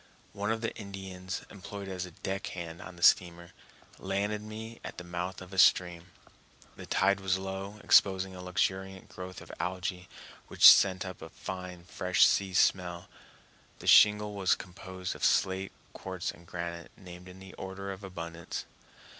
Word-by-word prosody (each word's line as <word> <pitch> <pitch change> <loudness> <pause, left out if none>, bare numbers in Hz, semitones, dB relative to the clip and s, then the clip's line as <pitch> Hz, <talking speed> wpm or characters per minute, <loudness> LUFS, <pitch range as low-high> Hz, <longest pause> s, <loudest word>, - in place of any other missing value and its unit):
One 105 +1 -3
of 110 0 -2
the 115 - -3
Indians, 95 -2 -7
employed 100 0 -8
as 90 -1 -4
a 85 - -16
deck 95 0 -2
hand 85 -1 -7
on 90 - -10
the 85 - -9
steamer, 85 -1 +4 0.5
landed 100 +2 -2
me 110 +2 -8
at - - -8
the 90 - -6
mouth 90 +1 -5
of 95 +1 -13
a 95 - -1
stream. 90 -2 +4 0.7
The - - -10
tide 100 +1 +2
was 95 -1 +1
low, 95 +2 -6
exposing 95 -1 +4
a 90 - -8
luxuriant 95 +1 -2
growth 90 0 -8
of - - -11
algæ, 90 0 -3 0.4
which - - +7
sent 95 -1 +7
up 95 -1 -8
a - - -8
fine, 90 -2 -7
fresh 90 0 +3
sea 95 -2 +1
smell. 90 -2 +1 0.7
The - - -12
shingle 105 0 +6
was 95 -2 +2
composed 95 0 -7
of - - -10
slate, 95 0 +2 0.2
quartz, - - -4
and 85 - -17
granite, 85 0 -5
named 90 0 -11
in 90 0 -12
the 95 0 -12
order 95 +1 -6
of 95 +1 -9
abundance. 85 -3 -6
95 Hz, 165 wpm, -30 LUFS, 90-95 Hz, 0.7 s, which